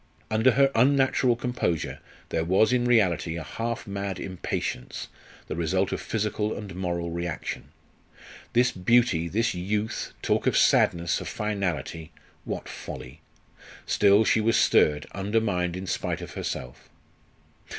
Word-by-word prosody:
Under 110 +4 +4
her 135 +2 +4
unnatural 130 0 +3
composure 120 -9 -2 0.3
there 80 - 0
was 95 +8 +3
in 120 -1 +2
reality 95 -8 +2
a 80 - -5
half 115 +5 -4
mad 100 -1 -4
impatience, 90 -8 -4 0.4
the - - -5
result 90 +3 0
of - - -3
physical 105 0 -2
and 100 -3 -7
moral 85 -2 -3
reaction. 85 -2 -4 0.9
This 125 +1 +4
beauty, 95 -3 +2
this 115 +7 0
youth, 105 +5 -2
talk - - +1
of - - +3
sadness, 85 0 +3
of - - -6
finality! 85 -6 -3 0.3
What - - -4
folly! - - -8 0.6
Still, 100 +2 +4
she 110 - +3
was 115 +2 +3
stirred, 75 -1 +3
undermined 95 -3 0
in 95 - -5
spite - - -2
of - - -8
herself. 60 0 -6
100 Hz, 130 wpm, -26 LUFS, 85-115 Hz, 0.9 s, Under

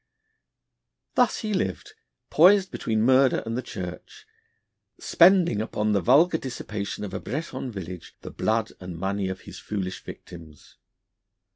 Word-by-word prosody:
Thus 250 -2 +2
he 215 -1 -2
lived, 95 - -2 0.4
poised 190 +4 +5
between 110 -1 -1
murder 130 +1 +4
and 115 0 -3
the 125 - -1
Church, 90 -7 -8 0.7
spending 170 - +4
upon 110 -1 -1
the 100 -2 +2
vulgar 155 - +4
dissipation 105 -6 -5
of 100 - -6
a - - -3
Breton 130 -1 -5
village 90 -4 -8
the - - -8
blood 110 0 0
and 90 -2 -8
money 95 +1 -2
of 95 - -6
his - - -11
foolish 95 -3 -5
victims. 80 -4 -12
110 Hz, 135 wpm, -25 LUFS, 95-140 Hz, 0.7 s, poised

